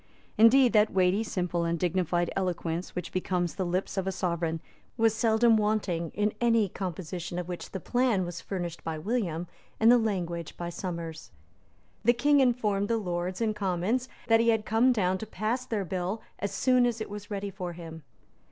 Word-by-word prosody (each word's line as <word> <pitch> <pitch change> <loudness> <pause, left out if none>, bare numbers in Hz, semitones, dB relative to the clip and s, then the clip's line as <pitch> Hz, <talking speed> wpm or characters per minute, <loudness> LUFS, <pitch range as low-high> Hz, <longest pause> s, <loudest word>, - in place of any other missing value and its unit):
Indeed 240 +3 +6
that 215 0 +4
weighty, 185 +3 +2
simple 180 -5 -1
and 170 0 0
dignified 175 0 0
eloquence 175 -2 -2
which 180 -1 -4
becomes 180 -2 -1
the 190 -1 -2
lips 185 +3 -2
of 190 0 -1
a - - +1
sovereign 170 -3 -1 0.4
was 225 -1 +4
seldom 225 0 +4
wanting 210 -6 0
in 210 +1 +1
any 230 -4 +3
composition 175 -1 -5
of 180 -1 -3
which 180 -1 -6
the 190 - -5
plan 240 -2 +1
was 175 -1 -6
furnished 175 -4 -5
by 160 -1 -3
William 175 -3 -2 0.3
and 225 +2 +6
the 245 - +6
language 175 -7 -3
by 175 0 -4
Somers. 170 -3 -6 0.7
The 240 - +5
King 285 +4 +3
informed 220 -6 +2
the 230 - +1
Lords 180 -1 -3
and 215 -2 +1
Commons 205 +6 -1 0.2
that 225 0 +4
he 230 0 +3
had 220 -2 +2
come 230 +4 +4
down 190 -5 +1
to 220 - -6
pass 235 +5 -2
their 210 -4 -1
bill 185 +4 -3 0.2
as 200 - -2
soon 255 -1 +3
as 235 -1 -2
it 220 - -4
was 205 0 -8
ready 200 -1 -3
for 180 -3 -5
him. 165 -1 -9
195 Hz, 185 wpm, -28 LUFS, 175-225 Hz, 0.7 s, Indeed